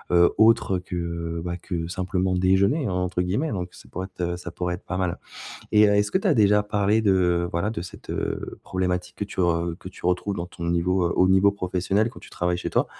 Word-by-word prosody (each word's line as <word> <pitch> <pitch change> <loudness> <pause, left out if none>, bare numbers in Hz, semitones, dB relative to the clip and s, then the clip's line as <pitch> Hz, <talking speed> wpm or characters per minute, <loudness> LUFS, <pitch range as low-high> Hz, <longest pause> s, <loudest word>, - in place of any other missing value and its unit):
heu, 85 0 +5
autre 110 -4 +4
que, 85 -2 -4
bah, 85 0 -2
que 85 -2 -4
simplement 95 +1 -1
déjeuner, 100 - +2
entre 90 0 -1
guillemets. 105 - -1
Donc 90 -2 -3
ça - - -15
pourrait 95 +2 -5
être - - -8
heu, 90 - -5
ça 90 0 -7
pourrait 90 0 -2
être 90 - -13
pas 95 - -3
mal. 90 -2 -1 0.6
Et 105 0 +7
heu, 105 - +3
est-ce 105 0 +2
que - - +3
tu 195 - -3
as - - +5
déjà 105 -2 +4
parlé 105 +1 +1
de, 90 -4 +2
voilà, 85 +5 0
de 110 -6 -4
cette, 90 - -11
heu, - - -3
problématique 90 -1 -2
que 105 - -2
tu 100 - -5
re 85 -1 +1
que - - -9
tu 95 - -7
retrouves 90 +3 0
dans 85 - -3
ton 85 -1 -8
niveau 90 +2 +1
heu, - - -1
au 90 - +4
niveau 95 +2 +5
professionnel 95 +2 0
quand 120 - -12
tu - - -14
travailles 90 0 -1
chez 90 - -4
toi, - - +2
90 Hz, 235 wpm, -24 LUFS, 90-100 Hz, 0.6 s, Et